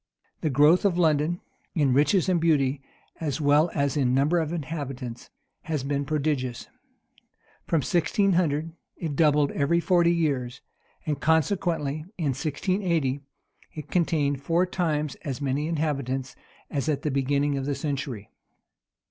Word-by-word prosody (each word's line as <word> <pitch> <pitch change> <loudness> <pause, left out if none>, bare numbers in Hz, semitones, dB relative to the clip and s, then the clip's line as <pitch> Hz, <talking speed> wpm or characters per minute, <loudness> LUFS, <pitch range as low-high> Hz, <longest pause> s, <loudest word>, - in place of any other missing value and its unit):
The 155 - -1
growth 150 +6 +5
of 190 -4 +2
London, 160 0 +2 0.3
in 145 -6 +3
riches 150 +8 +3
and 180 -3 +2
beauty, 140 -4 +2 0.4
as 155 -2 -2
well 150 +3 +4
as 140 -1 +1
in 130 -3 +2
numbers 150 +6 +3
of 155 -1 -3
inhabitants, 140 -7 -5 0.4
has 155 -5 -2
been 140 0 -1
prodigious. 140 -5 -1 1.0
From 165 - +2
1600, 170 - +1 0.3
it 160 -4 -4
doubled 150 -2 +3
every 150 +4 +1
forty 170 0 +3
years;[*] 135 -7 -1 0.4
and 150 -3 -1
consequently, 160 -2 0
in 160 -5 0
1680, 155 -1 -1 0.5
it 150 -1 -8
contained 150 -5 +1
four 170 +5 +2
times 155 -5 -1
as 140 -5 -4
many 140 +1 -1
inhabitants 140 -5 -2 0.4
as 145 +1 -1
at 145 -2 -1
the 150 - 0
beginning 140 +1 +1
of 135 0 -3
the 145 - 0
century. 140 -6 -4
150 Hz, 135 wpm, -26 LUFS, 140-165 Hz, 1.0 s, growth